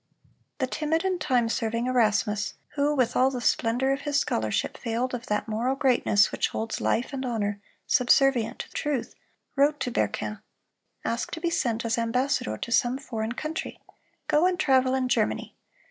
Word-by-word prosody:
The 265 - 0
timid 320 +6 -1
and 370 -3 0
time 245 -5 +2
serving 230 +1 -1
Erasmus, 215 -4 +1
who 295 +1 0
with 255 -4 +1
all 260 +1 +4
the 260 -2 -4
splendor 245 +2 +1
of 275 - -4
his 290 -1 +1
scholarship 110 - -1
failed 240 +2 -2
of 245 0 -5
that 210 +1 -1
moral 235 +5 0
greatness 245 -6 +3
which - - 0
holds 220 0 -4
life 245 +5 0
and 270 -1 -3
honor 205 -5 -2 0.2
subservient 250 -2 +3
to - - -10
truth, 290 -5 -2 0.4
wrote 290 +2 +3
to 250 - -1
Berquin: 215 -2 -2 0.6
"Ask 230 - -1
to 330 - -4
be 340 0 -1
sent 235 -7 0
as 230 +1 0
ambassador 230 - 0
to 235 - -6
some 245 +1 +2
foreign 230 -4 -4
country; 310 +5 -5 0.5
go 310 +4 +4
and 365 -1 -1
travel 260 -1 +3
in 260 -1 0
Germany. - - 0
250 Hz, 170 wpm, -26 LUFS, 225-275 Hz, 0.6 s, all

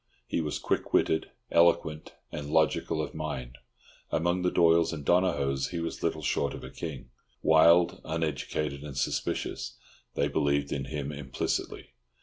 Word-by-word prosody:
He 85 - -1
was 75 -2 -2
quick - - -2
witted, 80 - +2 0.2
eloquent, 85 -2 +3 0.2
and 75 -1 -5
logical 80 0 +2
of 75 - -6
mind. 65 -5 -5 0.5
Among 85 +3 +1
the 90 - +2
Doyles 85 -1 +4
and 75 -4 -6
Donohoes 70 -7 +2
he 85 - -4
was 85 0 -4
little 80 -2 -1
short 70 - 0
of - - -9
a - - -8
king. 75 -7 -7 0.3
Wild, 85 +2 +5
uneducated, 75 -3 -2
and 70 -2 -7
suspicious, 70 - -2 0.4
they 70 - +2
believed 70 -1 +1
in 70 -1 -2
him 75 -1 -4
implicitly. 70 -3 -3
80 Hz, 145 wpm, -29 LUFS, 70-85 Hz, 0.5 s, Wild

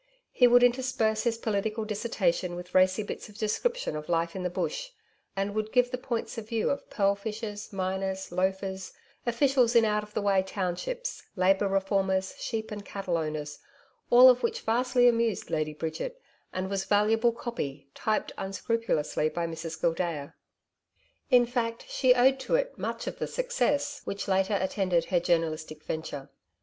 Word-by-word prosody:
He 250 - +5
would 245 0 +6
intersperse 245 -3 +2
his 230 -1 +1
political 215 0 -1
dissertation 200 -5 -1
with 180 +1 -9
racy 185 +3 +4
bits 205 - -7
of 210 - -14
description 230 - -1
of 150 +1 -6
life 165 0 0
in 190 - -3
the 180 - -1
Bush, - - -3 0.5
and 195 +1 -1
would 215 0 -2
give 250 -1 +3
the 250 - -2
points 235 -2 -3
of 215 -1 -10
view 230 -2 +1
of 280 - -4
pearl 200 -1 +2
fishers, 210 0 -6
miners, 190 0 -2
loafers, 190 +1 -2 0.3
officials 250 0 +3
in 230 -1 +6
out 210 0 +1
of 210 0 -13
the - - +1
way 195 -2 +3
townships, 195 - -3
Labour 195 +1 +3
reformers, 195 -1 0
sheep 220 -2 -3
and 205 -1 -5
cattle 195 -3 -3
owners 155 -2 -3 0.5
all 245 +2 +9
of 250 -1 +6
which 460 0 -1
vastly 245 +2 +3
amused 230 -3 +1
Lady 155 -1 -1
Bridget, 165 - -4 0.3
and 185 0 -3
was 195 0 -2
valuable 220 +3 +3
'copy,' 150 - -5
typed 215 -1 -1
unscrupulously 195 -7 -1
by 170 +1 -2
Mrs 165 -1 -5
Gildea. 165 -4 -1 1.0
In 250 -3 +6
fact, 235 -1 -2
she 255 -2 +4
owed 260 +2 +4
to 380 - 0
it - - 0
much - - -4
of - - -5
the - - -1
success - - 0
which, 200 0 -4
later, 195 +1 +2
attended 185 -3 +1
her 180 - +2
journalistic 155 -2 -1
venture. 145 -3 -5
205 Hz, 165 wpm, -28 LUFS, 185-235 Hz, 1.0 s, all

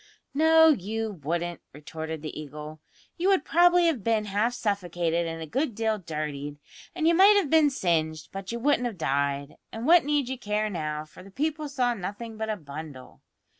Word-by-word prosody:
"No, 320 +2 +6
you 220 - -1
wouldn't," 170 +3 -3
retorted 160 +1 -7
the 155 - -5
Eagle. 150 +1 -9 0.4
"You 360 +3 +1
would 385 -2 +3
probably 350 +1 +5
have 300 - +1
been 220 -1 +1
half 210 +4 0
suffocated 175 -6 -1
and 165 0 -5
a - - -5
good 250 - -2
deal 220 -1 0
dirtied, 150 -4 -5 0.4
and 325 -2 +1
you 335 - +5
might 395 +4 +7
have 350 -9 0
been 315 -2 +5
singed, 160 - -1
but 195 +1 -6
you 235 - -3
wouldn't 250 0 +2
have 225 -5 -7
died; 140 -2 -1
and 225 +2 -5
what 340 +3 +6
need 290 -2 0
you 260 -1 -4
care 210 -1 -1
now, 155 -3 -3
for 155 - -15
the 195 - -13
people 300 +6 -2
saw 250 -3 +1
nothing 220 +3 -6
but 220 0 -4
a 215 - -1
bundle. 145 -4 -10
210 Hz, 190 wpm, -27 LUFS, -, 0.4 s, might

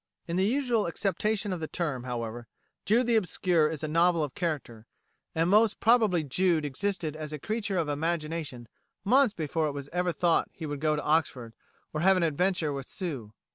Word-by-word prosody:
In 170 - -2
the 190 +2 +2
usual 245 -4 +1
acceptation 205 +3 -1
of 180 - -4
the 160 - -4
term, 145 -9 -3
however, 120 -1 -5 0.4
"Jude 235 +4 +3
the 235 -1 +2
Obscure" 175 -5 +2
is 160 -2 -5
a - - -1
novel 165 +1 +3
of 145 - -4
character; 140 -10 -4 0.5
and 165 +1 +2
most 210 +2 +4
probably 220 -8 +4
Jude 165 +2 +1
existed 160 +2 -2
as 155 -1 -6
a 150 - -4
creature 205 +3 -2
of 165 -3 0
imagination 155 -4 -3 0.4
months 250 +2 +4
before 160 0 -1
it 145 - -3
was 140 0 -6
ever 180 +1 0
thought 170 0 +1
he 165 - -8
would 145 -1 -4
go 155 +1 +1
to 150 - -3
Oxford, 130 -7 0 0.4
or 155 - -2
have 190 +2 +5
an 180 - +1
adventure 165 0 +1
with 135 -1 -6
Sue. 140 - -5
165 Hz, 190 wpm, -28 LUFS, 150-190 Hz, 0.5 s, have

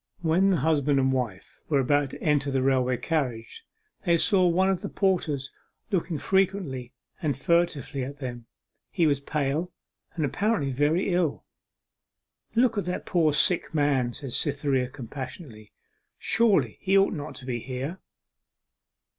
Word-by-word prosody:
When 175 +4 +3
the 185 - +3
husband 145 -1 +2
and 130 0 +2
wife 120 -8 -4
were 145 -3 +3
about 145 +1 +2
to - - -10
enter 145 -2 +2
the 135 -1 0
railway 130 -2 +2
carriage 125 -5 -3 0.4
they 170 -1 +3
saw 185 0 +3
one 185 +2 +3
of 190 -2 0
the - - -4
porters 160 -8 0 0.4
looking 175 -4 0
frequently 175 -7 0 0.3
and 150 -4 -1
furtively 150 -3 0
at 140 +3 -6
them. 120 -4 -7 0.4
He 175 -4 +1
was 145 -3 +2
pale, 150 +4 -2 0.4
and 160 -4 0
apparently 175 - 0
very 155 +8 +1
ill. 175 -5 0 1.1
'Look 230 -2 +3
at 200 - -3
that 180 - -3
poor 165 -4 +2
sick 165 +3 +1
man,' 135 -5 +1
said 135 -4 -6
Cytherea 135 -2 0
compassionately, 130 - -8 0.5
'surely 225 -3 +2
he 195 0 +3
ought 195 - +4
not 145 -5 -6
to 130 - -10
be 125 -2 -2
here. 135 +9 -5
145 Hz, 145 wpm, -26 LUFS, 130-175 Hz, 1.1 s, ought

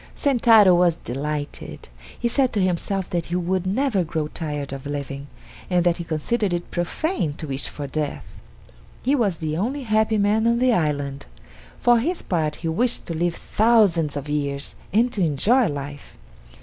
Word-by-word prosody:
Sentaro 230 -8 +5
was 175 -1 +4
delighted. 145 +3 -5 0.3
He 240 - +1
said 255 +1 +1
to 210 - 0
himself 185 +1 0
that 170 -1 -1
he 175 - -3
would 180 +1 -1
never 215 -1 +1
grow 155 -2 -3
tired 145 -4 -4
of 135 +1 -7
living, 140 -1 -5 0.4
and 180 -2 +2
that 175 -1 +2
he 170 - -4
considered 175 +6 -1
it 175 0 -4
profane 175 - -1
to 155 - -7
wish 135 -2 -2
for 145 - -6
death. 145 +1 -4 0.7
He 270 - +2
was 210 - +1
the 155 -1 -3
only 260 +9 -2
happy 220 -1 +2
man 210 +2 +2
on 235 0 +3
the 250 0 +3
island. 145 -6 -1 0.5
For 240 -1 +4
his 335 +9 -1
part 155 -4 -1
he - - +1
wished 235 +10 0
to 170 - -4
live 170 +1 0
thousands 200 -10 +2
of 145 +1 -5
years 140 -1 -2 0.2
and 235 +5 +2
to 200 - -2
enjoy 205 - +3
life. 145 0 -7
175 Hz, 175 wpm, -23 LUFS, 150-220 Hz, 0.7 s, Sentaro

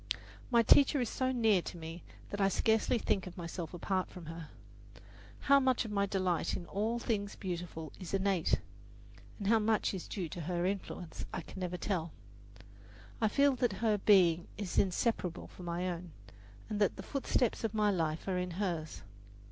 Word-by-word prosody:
My 235 -2 +5
teacher 280 +5 +6
is 245 -4 0
so 260 -1 0
near 225 -7 +3
to 175 - -7
me 165 +1 -7 0.3
that 205 - -2
I 195 - +5
scarcely 220 +4 +2
think 190 -4 0
of 180 - -10
myself 170 -1 -5
apart 185 +1 -1
from 180 -3 -10
her. 165 -1 -7 0.9
How 280 0 +6
much 260 -2 +2
of 220 - -5
my 200 -1 +1
delight 185 -3 0
in 175 - -7
all 215 +6 -1 0.4
beautiful 170 -4 -5
things - - -17
is - - -8
innate, 195 -3 +2 0.8
and 200 - -4
how 225 +1 +5
much 215 -1 +1
is 185 - -5
due 185 -5 -3
to 175 - -6
her 175 +2 -1
influence, 185 -3 -4
I - - -3
can 190 - -10
never 180 -1 -2
tell. 175 -4 -2 1.1
I 220 - +4
feel 280 +5 +4
that 245 -4 +1
her 210 +1 +1
being 175 -5 +5
is 200 -4 0
inseparable 185 -2 0
from 180 - -11
my 175 +1 -2
own, 175 -2 -5 0.5
and 210 - -3
that 205 - +3
the - - -7
footsteps 255 -5 0
of 220 -1 -1
my 210 -1 +3
life 160 -3 -1
are 185 -2 0
in 180 0 -2
hers. 170 -6 -2
190 Hz, 180 wpm, -33 LUFS, 175-215 Hz, 1.1 s, teacher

